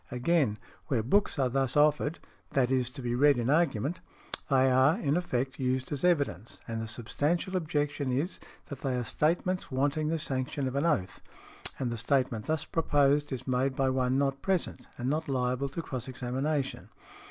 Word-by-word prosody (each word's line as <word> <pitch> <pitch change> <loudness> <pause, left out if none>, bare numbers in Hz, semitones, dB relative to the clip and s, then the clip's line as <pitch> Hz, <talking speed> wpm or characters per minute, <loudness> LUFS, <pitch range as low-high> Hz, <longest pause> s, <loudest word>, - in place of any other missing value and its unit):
Again, 125 -2 +1 0.3
"where 120 -5 +1
books 200 - +2
are 135 -2 +2
thus 135 +1 0
offered 150 +1 +3 0.4
(i. 135 - +5
e., 130 +1 +2
to 125 +2 -6
be 120 -1 -1
read 140 +2 +5
in 120 +2 +1
argument), 150 -1 +1 0.5
they 130 -1 +4
are, 130 +7 +4
in 145 -10 +1
effect, 130 -7 -1
used 130 0 -1
as 145 -2 -3
evidence, 140 - 0
and 115 -1 -3
the 110 - -4
substantial 145 - -1
objection 145 -5 -1
is, 145 +9 -1 0.3
that 140 -2 -7
they 135 -2 -1
are 125 - -1
statements 175 +8 0
wanting 145 +3 0
the 165 +1 0
sanction 135 -2 -2
of 130 - -3
an 140 +4 +2
oath; 100 - -1 0.6
and 125 -3 -2
the 115 - -3
statement 115 -1 0
thus 155 -1 0
proposed 145 -2 +2
is 130 -1 -4
made 130 +1 +1
by 135 -1 +2
one 130 0 +1
not 135 -1 0
present, 190 -3 -1
and 125 - -3
not 150 +2 -1
liable 130 +1 0
to 165 +5 -5
cross 130 -3 -4
examination. 130 +3 -2
135 Hz, 180 wpm, -29 LUFS, 125-150 Hz, 0.6 s, i